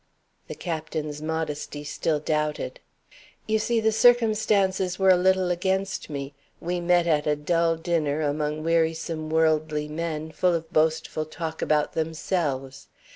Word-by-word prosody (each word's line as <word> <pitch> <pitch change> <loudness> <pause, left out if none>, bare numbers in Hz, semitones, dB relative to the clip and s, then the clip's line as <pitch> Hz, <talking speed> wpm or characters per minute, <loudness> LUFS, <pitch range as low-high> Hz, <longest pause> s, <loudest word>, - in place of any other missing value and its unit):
The - - -6
Captain's 155 -3 -4
modesty 155 -2 -3
still 150 +1 -1
doubted. 150 - -2 0.7
"You 220 0 +1
see, 235 +1 +1
the 220 0 +2
circumstances 215 -5 +3
were 190 -1 +5
a - - +7
little 185 0 +2
against 190 +1 -1
me. 140 -1 -5 0.3
We 175 +1 -2
met 175 0 +3
at 150 -3 +1
a 150 - +3
dull 165 +2 +1
dinner, 160 -3 -1
among 150 +1 -1
wearisome 160 -1 0
worldly 155 -1 +1
men, 160 0 -4
full 180 +1 +2
of 165 -1 -5
boastful 155 0 +1
talk 160 0 -5
about 150 -1 +1
themselves. 155 -4 -2
160 Hz, 135 wpm, -25 LUFS, 150-180 Hz, 0.7 s, a